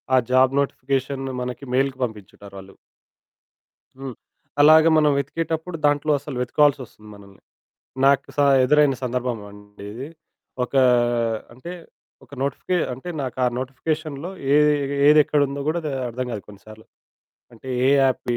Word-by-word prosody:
ఆ -, -, +5 dB
job 130 Hz, 0 st, +4 dB
notification 135 Hz, 0 st, -3 dB, 0.2 s
మనకి 125 Hz, +2 st, -6 dB
మెయిల్‌కి 135 Hz, 0 st, 0 dB
పంపించుంటారు 100 Hz, -3 st, -8 dB
వాళ్ళు. 95 Hz, 0 st, -12 dB, 1.2 s
హ్మ్, 135 Hz, -3 st, -7 dB, 0.5 s
అలాగ 155 Hz, +2 st, +7 dB
మనం 150 Hz, -1 st, +4 dB
వెతికేటప్పుడు 160 Hz, +4 st, -3 dB
దాంట్లో 145 Hz, +1 st, +2 dB
అసలు 140 Hz, 0 st, -8 dB
వెతుక్కొవాల్సొస్తుంది 125 Hz, -4 st, 0 dB
మనల్ని. 100 Hz, -1 st, -17 dB, 0.6 s
నాకు 140 Hz, 0 st, +3 dB
స -, -, -22 dB, 0.3 s
ఎదురైన 150 Hz, +1 st, +4 dB
సందర్భమండి 105 Hz, -5 st, -5 dB
ఇది. 130 Hz, +6 st, -7 dB, 0.6 s
ఒక 125 Hz, -, -12 dB, 0.8 s
అంటే 130 Hz, +9 st, -9 dB, 0.5 s
ఒక -, -, -28 dB
నోటిఫికే 140 Hz, +6 st, -1 dB
అంటే 130 Hz, +8 st, -8 dB
నాకు 130 Hz, -, -5 dB
ఆ -, -, +3 dB
నోటిఫికేషన్‌లో 150 Hz, +4 st, -4 dB, 0.2 s
ఏది, 150 Hz, 0 st, +5 dB, 0.4 s
ఏదెక్కడుందో 145 Hz, -2 st, +3 dB
గూడా 165 Hz, +2 st, 0 dB
ద -, -, -2 dB, 0.2 s
అర్థం 125 Hz, +2 st, -4 dB
గాదు 105 Hz, -3 st, -5 dB
కొన్నిసార్లు. 110 Hz, +2 st, -14 dB, 0.7 s
అంటే 120 Hz, +3 st, -13 dB, 0.2 s
ఏ -, -, +4 dB
యాప్‌కి 125 Hz, -2 st, 0 dB
135 Hz, 125 wpm, -22 LUFS, 120-150 Hz, 1.2 s, అలాగ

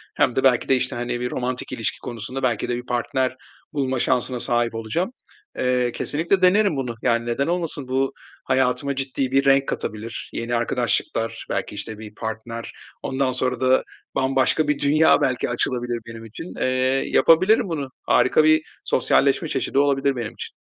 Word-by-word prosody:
hem 120 Hz, -, +2 dB
de 130 Hz, -, +1 dB
belki 125 Hz, -3 st, +3 dB
de 135 Hz, -, +5 dB
işte, 130 Hz, +1 st, -2 dB
hani, 120 Hz, 0 st, -3 dB
bir 125 Hz, 0 st, -3 dB
romantik 125 Hz, 0 st, -3 dB
ilişki 115 Hz, -, -2 dB
konusunda 120 Hz, +3 st, -5 dB
belki 120 Hz, -4 st, 0 dB
de 120 Hz, -, 0 dB
bir 125 Hz, -, -7 dB
partner 130 Hz, +1 st, -1 dB, 0.4 s
bulma 130 Hz, -3 st, -1 dB
şansına 125 Hz, 0 st, 0 dB
sahip 120 Hz, -1 st, 0 dB
olacağım. 115 Hz, -, -2 dB, 0.5 s
Eee, 125 Hz, -1 st, +1 dB
kesinlikle 165 Hz, +10 st, 0 dB
denerim 195 Hz, -1 st, +4 dB
bunu. 125 Hz, -4 st, -3 dB
Yani, 115 Hz, 0 st, +1 dB
neden 120 Hz, +4 st, -1 dB
olmasın? 165 Hz, -6 st, -2 dB
Bu 135 Hz, +1 st, 0 dB, 0.3 s
hayatıma 130 Hz, +2 st, +1 dB
ciddi 135 Hz, -1 st, -2 dB
bir 135 Hz, +1 st, +3 dB
renk 135 Hz, 0 st, +4 dB
katabilir, 110 Hz, +2 st, -5 dB
yeni 120 Hz, +1 st, -2 dB
arkadaşlıklar 115 Hz, -1 st, -1 dB
belki, -, -, -3 dB
işte, 110 Hz, -, -6 dB
bir 105 Hz, -1 st, -10 dB
partner, 115 Hz, +1 st, -5 dB, 0.3 s
ondan 130 Hz, 0 st, 0 dB
sonra 125 Hz, -1 st, 0 dB
da 130 Hz, 0 st, +3 dB, 0.3 s
bambaşka 135 Hz, +3 st, +2 dB
bir 150 Hz, -1 st, +1 dB
dünya 155 Hz, +3 st, +4 dB
belki 130 Hz, -1 st, 0 dB
açılabilir 120 Hz, 0 st, -1 dB
benim 115 Hz, 0 st, -9 dB
için. 140 Hz, -, -9 dB
Eee, -, -, +2 dB, 0.4 s
yapabilirim 185 Hz, +6 st, +4 dB
bunu. 145 Hz, -5 st, -3 dB, 0.2 s
Harika 130 Hz, +5 st, +4 dB
bir 155 Hz, 0 st, +5 dB, 0.2 s
sosyalleşme -, -, +2 dB
çeşidi 135 Hz, -, 0 dB
olabilir 140 Hz, -1 st, +2 dB
benim 115 Hz, -3 st, -4 dB
için. -, -, -8 dB
130 Hz, 165 wpm, -23 LUFS, 120-140 Hz, 0.5 s, de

